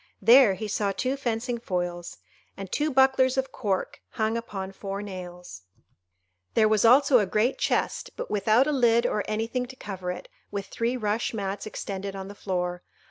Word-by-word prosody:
There 230 -1 +7
he 215 +2 -5
saw 205 -1 0
two 255 +7 -1
fencing 240 -2 -2
foils, 175 -4 -3 0.4
and 195 -2 -7
two 300 +1 0
bucklers 265 0 +4
of 265 0 -1
cork 195 -6 -2
hung 220 -1 0
upon 195 -5 -5
four 195 +1 -5
nails; 180 - -8 0.9
there 220 -1 +5
was 215 -1 +2
also 255 +2 +6
a 205 - 0
great 215 +7 +1
chest, - - 0
but - - -5
without 215 +5 +3
a 300 - 0
lid 235 -4 +3
or 210 - 0
anything 225 +4 -2
to 265 - -11
cover 190 -7 -6
it, 180 - -8 0.2
with 200 -1 -4
three 235 +5 -2
rush 220 +1 -1
mats 200 0 -3
extended 195 -2 -5
on 195 0 -6
the - - -8
floor. 180 -3 -3
215 Hz, 175 wpm, -26 LUFS, 195-245 Hz, 0.9 s, There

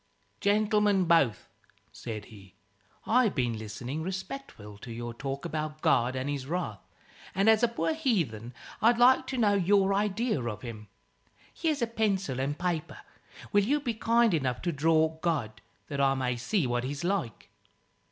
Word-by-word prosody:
"Gentlemen 210 -2 +2
both," 165 -10 +2 0.4
said 105 -2 -7
he, 100 -3 -15 0.5
"I've 230 -2 +3
been 120 -3 0
listening 120 +7 -5
respectful 185 - -7
to 120 - -9
your 120 +1 -5
talk 135 +5 -5
about 155 -2 -4
God 120 +2 +3
and 130 +1 -3
his 140 -2 -3
wrath, 155 - -3 0.6
and 195 +2 +2
as 220 -1 +6
a 240 - +5
poor 235 +7 -1
heathen 165 - -1 0.3
I'd 230 +2 +5
like 250 +2 +5
to 260 - -3
know 210 -4 +3
your 195 0 +3
idea 210 - 0
of 110 -3 -5
him. 110 -3 -8 0.7
Here's 305 -6 -1
a - - +4
pencil 200 - -1
and 140 +3 -1
paper. 175 -3 -2 0.6
Will 205 0 +5
you 285 +8 +1
be 245 -5 -2
kind 230 -1 +3
enough 130 -6 -1
to 175 - 0
draw 160 +1 +2
God? 145 -11 -2 0.3
that 140 -2 -2
I 135 0 +3
may 125 -2 -1
see 140 - 0
what 120 0 -1
he's 140 +4 -4
like." 175 - -2
160 Hz, 160 wpm, -29 LUFS, 125-210 Hz, 0.7 s, as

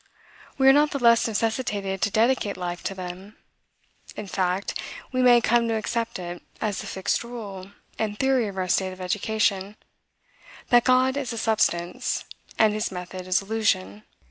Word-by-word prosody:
We 265 -1 +4
are 270 - +9
not 295 +1 +4
the 285 - -3
less 235 -3 +4
necessitated 210 -3 -1
to 205 - +2
dedicate 220 0 +1
life 175 -1 -4
to 195 - -2
them. 185 +3 -8 0.8
In 210 - -6
fact, 185 0 -1 0.3
we 255 -1 0
may 245 -1 +6
come 235 +1 +3
to 225 - 0
accept 230 +2 -2
it 175 -1 -6 0.2
as 210 -3 -2
the - - -8
fixed 190 +4 -1
rule 205 -6 -8 0.3
and 210 -2 -2
theory 265 -3 +2
of 195 -1 -7
our 185 -1 -1
state 185 +1 +1
of 185 - -13
education, 200 +1 0 0.9
that 240 -2 +5
God 255 +1 +3
is 265 -4 -3
a - - -5
substance, 180 -6 0 0.3
and 220 -1 +4
his 215 0 -2
method 180 0 -7
is 185 +1 +2
illusion. 195 - 0
210 Hz, 170 wpm, -25 LUFS, 185-235 Hz, 0.9 s, are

